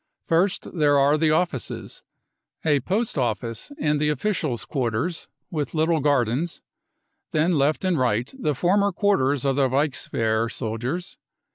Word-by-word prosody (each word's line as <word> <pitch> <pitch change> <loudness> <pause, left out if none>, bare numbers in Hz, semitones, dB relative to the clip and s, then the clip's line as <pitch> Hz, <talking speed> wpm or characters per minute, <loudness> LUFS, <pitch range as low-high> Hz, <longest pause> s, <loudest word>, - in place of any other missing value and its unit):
First 185 +4 0
there 145 -1 +4
are 140 +2 +4
the 155 0 +2
offices, 155 -4 -2 0.6
a 150 -3 +4
post 195 - -1
office 115 - -2
and 150 - 0
the 150 - +2
officials' 150 - -1
quarters 130 +6 -2 0.2
with 150 -3 -3
little 160 +1 +2
gardens, 145 +2 0 0.7
then 160 +3 +2
left 150 +5 +1
and 180 -5 +1
right 120 - 0
the 155 - -1
former 200 +3 +2
quarters 145 - +1
of 135 -1 +1
the 135 -2 +3
Reichswehr 115 -5 0
soldiers. 125 +10 -4
150 Hz, 135 wpm, -24 LUFS, 130-170 Hz, 0.7 s, there